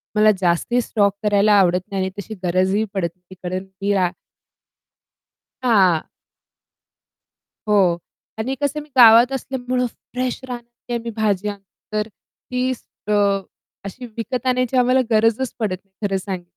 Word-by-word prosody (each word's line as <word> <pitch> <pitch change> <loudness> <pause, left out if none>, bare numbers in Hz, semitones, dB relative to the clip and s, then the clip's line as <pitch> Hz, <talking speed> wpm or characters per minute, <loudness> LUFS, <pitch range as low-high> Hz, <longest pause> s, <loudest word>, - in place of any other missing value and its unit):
मला 215 0 +6
जास्ती 180 +8 +2
स्टॉक 205 -4 +1
करायला 205 0 +4
आवडत 180 -1 +3
नाही 195 -1 -1
आणि 190 - -1
तशी 220 +2 -6
गरजही 185 +4 +2
पडत 185 -4 0
नाही. 180 +1 -16
कारण 185 +1 -3
की 195 +1 -2
आ 185 -3 +2 1.5
हां. 190 -9 +4 1.6
हो. 190 -5 +4 0.4
आणि 255 +5 -1
कसं 285 +1 0
आहे - - -6
मी 300 - -20
गावात 235 +1 +8
असल्यामुळं 255 -1 -2
फ्रेश 250 +1 -4
रानातली 240 0 -8
आम्ही 235 0 -4
भाज्या 205 -2 0 0.4
तर 210 0 0
ती 250 +3 -5 0.4
अ, - - -1 0.7
अशी 245 +6 -7
विकत 245 +2 -3
आणण्याची 255 0 +1
आम्हाला 250 +1 +4
गरजच 225 +3 +2
पडत 205 -4 0
नाही, 195 - -41 0.2
खरं 195 -1 0
सांग 190 -2 -5
215 Hz, 140 wpm, -21 LUFS, 190-245 Hz, 1.6 s, गावात